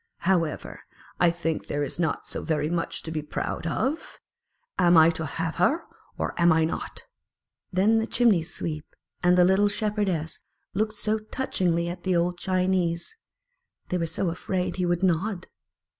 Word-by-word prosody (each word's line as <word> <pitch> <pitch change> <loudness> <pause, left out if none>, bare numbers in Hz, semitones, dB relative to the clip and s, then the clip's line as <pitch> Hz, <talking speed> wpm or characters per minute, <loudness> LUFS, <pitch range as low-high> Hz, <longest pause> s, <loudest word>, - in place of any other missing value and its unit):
"However, 170 -4 0 0.4
I 175 - +5
think 165 -2 -2
there 145 0 -1
is 145 - -5
not 160 -4 0
so - - -5
very 150 -1 -1
much 170 -1 -2
to 160 - -5
be 155 -1 -2
proud 150 +2 -4
of. 270 - -2 0.6
Am 175 -2 +6
I 160 +1 +7
to 160 -1 -4
have 165 +2 -3
her, 280 - +2 0.3
or - - -2
am 170 0 +6
I 160 0 +4
not?" 160 - -5 0.7
Then 205 +4 +3
the 225 - -1
Chimney 230 -8 +4
sweep 160 -2 -5 0.3
and 180 0 +4
the 180 - +7
little 190 +3 +4
Shepherdess 205 -6 -1 0.3
looked 215 +2 0
so 215 +1 -1
touchingly 185 -7 -1
at 175 +1 -5
the 185 -1 +1
old 175 +1 +1
Chinese; 185 - 0 0.7
they 180 - 0
were 165 - 0
so 170 +3 -1
afraid 180 +1 -2
he 180 -1 0
would 175 +1 0
nod 185 +1 +1
175 Hz, 165 wpm, -26 LUFS, 165-190 Hz, 0.7 s, I